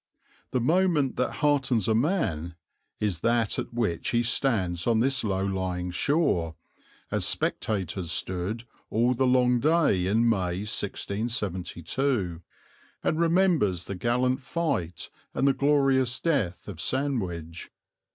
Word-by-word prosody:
The 125 - 0
moment 155 0 +2
that 125 - 0
heartens 135 -8 +2
a 110 - +3
man 110 - 0 0.4
is 100 -6 -1
that 115 +2 +1
at - - -5
which 110 -9 -1
he 120 0 +2
stands 100 -8 0
on 115 -2 +3
this 130 +2 +1
low 95 -2 0
lying 90 -2 -2
shore, 90 - +1 0.6
as - - +1
spectators 95 -4 -1
stood 95 +7 -2 0.3
all 120 +3 +2
the 130 +1 +1
long 125 -1 +3
day 145 - +2
in 115 +4 +2
May, 95 -3 0
1672, 100 - -2 0.6
and 155 - 0
remembers 165 - +2
the 100 - -5
gallant 125 +6 0
fight 130 - -3 0.2
and 135 - +2
the 135 - +4
glorious 135 -3 +2
death 130 - -1
of 90 -6 -6
Sandwich. 90 - -2
115 Hz, 125 wpm, -27 LUFS, 90-135 Hz, 0.6 s, the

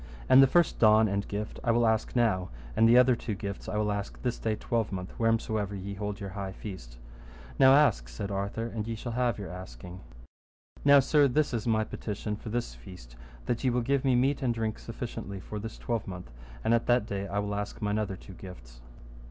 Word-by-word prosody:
And 130 +1 +8
the 135 - +7
first 175 +4 +2
don 110 0 +6
and 100 0 -2
gift 105 +1 -5
I - - -1
will 120 0 +4
ask 110 +1 0
now, 100 -7 +2 0.3
and 115 0 +5
the 120 - +7
other 125 0 +6
two 110 -2 -4
gifts 100 +2 -6
I 105 - -2
will 105 0 +1
ask 100 -1 -4
this 125 -2 -1
day 110 -1 -1
twelvemonth, 100 -5 -2
wheresomever 110 -3 0
ye 100 +1 -5
hold 105 0 -4
your 100 -1 -6
high 95 -1 -5
feast. 90 - -9 0.6
Now 135 0 +8
ask, 115 - +3
said 100 +12 -5
Arthur, 100 +3 -2
and 115 -2 -4
ye 115 - -3
shall 120 +2 -6
have 120 -2 0
your 100 -3 -6
asking. 90 0 -9 0.8
Now, 140 -1 +7
sir, 145 +1 +4
this 150 +2 +1
is 115 0 -2
my 110 -1 +2
petition 105 0 -4
for 110 - -8
this 115 - -2
feast, - - -13 0.3
that 120 - -2
ye 130 - +3
will 125 0 +1
give 135 +3 0
me 130 -2 +3
meat 135 +4 +2
and 120 -3 0
drink 110 -1 -2
sufficiently 115 -4 -6
for 105 +3 -6
this 110 +2 -7
twelvemonth, 95 - -4 0.3
and 115 - +2
at 115 - +1
that 120 -2 +3
day 100 -1 -4
I 100 - -4
will 100 0 -1
ask 105 0 -4
mine 105 0 0
other 100 -3 -2
two 95 - -12
gifts. - - -12
110 Hz, 215 wpm, -29 LUFS, 100-120 Hz, 0.8 s, And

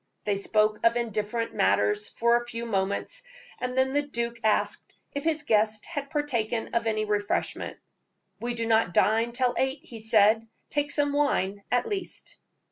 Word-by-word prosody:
They 205 - 0
spoke 215 +2 +2
of 230 0 +4
indifferent 230 0 -2
matters 420 0 +2
for 235 +1 +3
some 240 - -10
few 235 0 -5
moments, 200 - -1 0.4
and 250 0 -3
then 260 0 +2
the 290 - +3
duke 235 -4 -3
asked 215 -1 0 0.2
if 285 - -3
his 315 -1 0
guest 215 -3 +2
had 285 -4 -5
partaken 240 -7 -1
of 235 -1 +1
any 215 -1 0
refreshment. 205 -1 -1 0.6
"We 240 +2 -3
do 230 -1 -2
not 220 -6 +2
dine 225 +2 +3
till 245 0 +1
eight," 265 +3 -1
he 235 -9 -10
said; 220 0 +4 0.2
"take 290 -1 0
some 290 -1 +2
wine, 205 -9 +1
at 245 0 +2
least." 390 -4 -5
235 Hz, 165 wpm, -27 LUFS, 215-275 Hz, 0.6 s, of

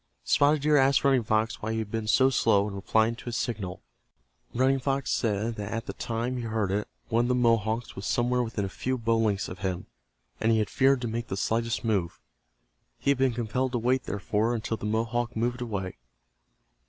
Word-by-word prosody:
Spotted 145 0 +3
Deer 150 0 +4
asked 135 0 +4
Running 135 -2 +4
Fox 110 +2 0
why 110 +1 -2
he - - -2
had 110 -2 -3
been 110 -1 -3
so 130 +4 +4
slow 105 -5 +3
in 105 - -6
replying 110 +3 +1
to - - -12
his 120 -1 -3
signal. 105 -7 -4 0.7
Running 135 +2 +2
Fox 135 0 -1
said 110 +1 0
that 105 0 -5
at 115 -1 -3
the - - -5
time 120 +1 -3
he - - -3
heard 110 -4 -1
it 105 +2 -1 0.2
one 115 +1 +2
of - - -2
the 125 - +3
Mohawks 115 -1 +1
was 100 - -5
somewhere 120 +1 +1
within 115 -4 -2
a - - -2
few 130 +7 -2
bow 115 -1 +1
lengths 105 -3 +1
of 90 - -8
him, 95 -2 -3 0.5
and 110 - +2
he 110 - +4
had 105 -1 0
feared 135 -1 +3
to 120 - -2
make 115 +1 -3
the 95 - -4
slightest 115 +3 -1
move. 100 -7 -1 0.8
He 140 - +1
had 140 - 0
been 130 -3 +2
compelled 125 +3 -1
to - - +1
wait, 125 +2 +1
therefore, 105 +4 0
until 110 0 -2
the 105 -1 -5
Mohawk 115 +2 -1
moved 120 +2 -1
away. 95 - -4
115 Hz, 215 wpm, -27 LUFS, 110-125 Hz, 0.8 s, Deer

